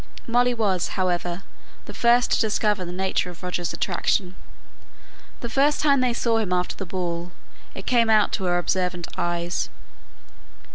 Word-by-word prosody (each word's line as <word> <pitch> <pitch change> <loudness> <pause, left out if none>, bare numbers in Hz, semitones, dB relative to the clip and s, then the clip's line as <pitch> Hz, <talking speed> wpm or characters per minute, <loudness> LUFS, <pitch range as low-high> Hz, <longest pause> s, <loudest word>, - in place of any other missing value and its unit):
Molly 245 +1 +2
was, 195 -6 +1
however, 180 0 -1 0.4
the - - -8
first 240 +1 +3
to - - +3
discover 210 -2 +1
the 175 - -6
nature 190 0 -1
of 175 0 -12
Roger's 180 -2 -2
attention. 185 0 0 1.1
The 235 - -3
first 280 +5 +2
time 280 -3 +4
they 250 -1 +2
saw 235 -1 +1
him 210 -5 -2
after 180 0 0
the 195 - -6
ball, 175 -1 -3 0.4
it - - -7
came 235 -3 +3
out 215 -1 +4
to 190 - -2
her 175 0 +2
observant 180 -1 -1
eyes. 175 +1 -1
190 Hz, 155 wpm, -24 LUFS, 180-230 Hz, 1.1 s, time